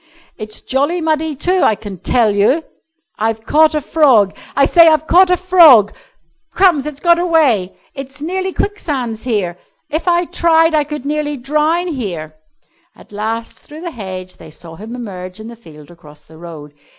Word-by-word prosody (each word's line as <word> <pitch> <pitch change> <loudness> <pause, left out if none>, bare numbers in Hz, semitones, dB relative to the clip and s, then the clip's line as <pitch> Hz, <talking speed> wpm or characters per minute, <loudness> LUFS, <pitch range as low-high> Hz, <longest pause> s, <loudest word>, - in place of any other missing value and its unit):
"It's 215 0 -8
jolly 285 +7 -1
muddy, 315 -1 -1
too, 365 +6 0
I 220 - +3
can 200 -3 -10
tell 225 +1 +1
you." 220 +11 +2 0.6
"I've 220 0 -2
caught 310 +4 +3
a 300 - 0
frog! 255 -11 +3 0.2
I 275 - +4
say, 335 +3 +5
I've 310 -1 +3
caught 360 +3 +4
a 360 - +2
frog!" 330 - +5 0.6
"Crumbs! 335 -6 +2
It's 295 -2 -7
got 340 +1 +3
away!" 295 - +1 0.2
"It's 270 +1 -9
nearly 375 +5 -3
quicksands 265 - -4
here." 190 -7 -2 0.3
"If 315 +4 -3
I 350 0 +2
tried 325 -1 +2
I 300 -1 +2
could 295 -2 -7
nearly 295 0 -2
drown 305 +7 0
here!" 180 - -5 0.6
At - - -19
last, 220 +2 -5
through 305 +2 -13
the 345 -1 -6
hedge, 185 - -8
they 160 - -13
saw 165 +2 -12
him 220 +7 -9
emerge 185 -5 -8
in 220 +1 -9
the 235 - -10
field 155 -8 -16
across 150 -3 -16
the 160 +1 -17
road. 155 -4 -11
270 Hz, 175 wpm, -16 LUFS, 205-320 Hz, 0.6 s, say